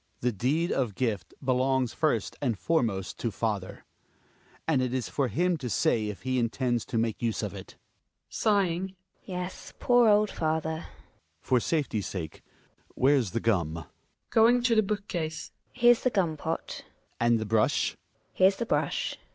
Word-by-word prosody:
Hjalmar. - - -39
The 125 - +1
deed 155 - +1
of 120 -7 -1
gift 115 -5 -2
belongs 130 -1 +1
first 145 -9 0
and 120 -7 0
foremost 110 - -1
to 115 - -1
father; 105 -3 -3 0.8
and 150 -5 +3
it 130 0 -1
is 125 -3 -2
for 140 -3 0
him 175 +6 +1
to 130 -5 -5
say 110 0 +1
if 105 -2 -7
he 130 0 0
intends 120 0 0
to 115 - -3
make 115 -1 -1
use 115 -2 -1
of - - -3
it - - -10
GiNA - - -45
{sighing). 190 -3 +1 0.3
Yes, 180 -1 -6
poor 245 -2 +4
old 210 0 +4
father 160 0 -2
Hjalmar. 80 +1 -27
For 125 - +2
safety's 125 - -1
sake 80 -5 -6 0.5
Where's 130 -5 +3
the 105 - -2
gum? 90 -9 +1
Gin 85 - -6
A - - -23 0.4
{going 235 +2 +5
to 245 -1 +3
the 220 - +6
book 205 0 -3
case). 160 -3 -4 0.2
Here's 240 -1 +4
the 255 - +2
gum 180 -9 0
pot 160 +2 -4
Hjalmar. - - -37
And 120 0 +3
the 110 - -3
brush? 110 0 +2
GiNA. - - -21 0.4
Here's 190 +1 +4
the 235 - -3
brush. - - -1
130 Hz, 180 wpm, -28 LUFS, 115-180 Hz, 0.8 s, the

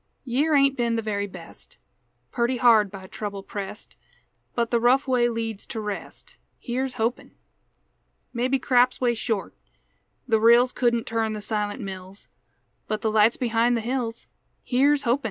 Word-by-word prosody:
Year 285 +5 +1
ain't 275 -1 +4
been 235 -2 0
the 225 - -2
very 205 -1 -2
best; 195 - -11 0.5
Purty 240 +1 0
hard 225 -4 +5
by 190 -1 -10
trouble 200 0 -6
pressed; 200 +1 -7 0.6
But 235 -1 0
the 235 - +3
rough 255 +4 +3
way 245 -2 +3
leads 225 -3 -4
to 225 - -5
rest, 210 -2 -7 0.2
Here's 255 +1 -3
hopin'! 235 +1 -2 1.0
Maybe 255 +2 +1
craps 250 -1 +2
way 245 -2 +2
short; 225 -3 -3 0.7
the 225 -3 +3
rills 235 +3 +5
Couldn't 235 -2 +1
turn 225 -1 -1
the 215 - -4
silent 210 +2 -3
mills; 190 -1 -8 0.6
But 215 0 -2
the 220 - +1
light's 215 +2 +4
behind 235 0 +1
the - - -2
hills, 235 -1 -3 0.4
Here's 280 +3 +2
hopin'! 245 +3 +2
235 Hz, 155 wpm, -25 LUFS, 215-250 Hz, 1.0 s, hard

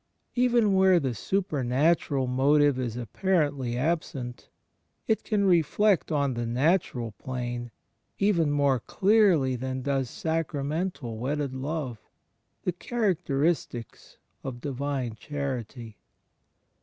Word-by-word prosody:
Eveni 245 -2 +3
where 190 -2 +5
the 135 -5 -1
supernatural 145 - +1
motive 140 +2 +3
is 120 -2 -3
apparently 140 - 0
absent, 135 -4 -2 0.6
it 220 - +1
can 205 -3 +1
reflect 185 +2 +3
on 140 -3 +1
the 120 -1 -3
natural 125 -2 +1
plane, 120 +2 -5 0.5
even 185 -7 +2
more 140 -3 +2
clearly 190 - +3
than 130 +1 -4
does 135 -2 0
sacramental 150 -5 -2
wedded 140 +2 -2
love, 135 -3 -4 0.6
the 180 - +1
characteristics 170 - -2 0.3
of 130 -3 -5
divine 135 -3 -3
charity. 125 -4 -5
140 Hz, 100 wpm, -27 LUFS, 125-170 Hz, 0.6 s, where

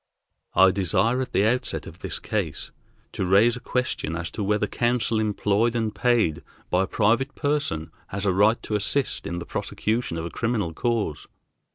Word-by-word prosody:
I 95 +1 +7
desire 100 +7 +1
at 130 - -4
the 100 - +3
outset 125 +3 0
of - - -11
this - - -3
case - - -3 0.4
to - - -3
raise 100 +6 +4
a - - -6
question 125 -11 -2
as 85 0 -4
to 105 - -3
whether 105 +1 +1
counsel 120 0 0
employed 110 +2 +1
and 110 -2 0
paid 115 -12 +2 0.3
by 95 +2 +3
a - - -12
private 120 +10 +1
person 145 - -1 0.2
has 100 +1 -4
a 95 - +3
right 105 +5 +4
to 105 - -2
assist 130 +7 0
in 85 - -3
the 85 - -5
prosecution 110 -5 -2
of 80 - -3
a 85 - -5
criminal 110 -8 -1
cause. 110 -6 -1
105 Hz, 180 wpm, -25 LUFS, 95-120 Hz, 0.4 s, I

